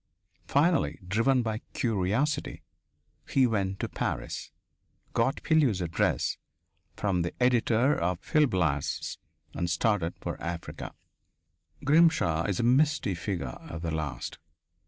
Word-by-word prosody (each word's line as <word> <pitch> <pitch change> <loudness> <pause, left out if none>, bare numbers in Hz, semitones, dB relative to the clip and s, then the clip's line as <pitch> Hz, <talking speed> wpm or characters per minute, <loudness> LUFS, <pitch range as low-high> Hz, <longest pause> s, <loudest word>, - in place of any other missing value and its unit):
Finally, 165 +5 +2
driven 120 +6 +2
by 110 -1 -2
curiosity, 120 +8 0 0.7
he 135 -2 +4
went 95 -5 0
to - - -1
Paris, - - -4 0.6
got 125 +4 +1
Pilleux's 145 - +3
address 85 -2 0 0.6
from 95 -4 +1
the 85 - -2
editor 125 +2 +3
of 90 +1 0 0.2
Gil 150 -1 +6
Blas, 80 - -1 0.3
and 85 - -2
started 90 -1 +1
for - - -5
Africa. 85 0 -5 0.9
Grimshaw 145 - +4
is 100 -3 -1
a - - +1
misty 130 -3 +3
figure 85 - -3
at 80 +1 -6
the 85 - -2
last. 75 -3 -4
105 Hz, 115 wpm, -28 LUFS, 85-130 Hz, 0.9 s, Gil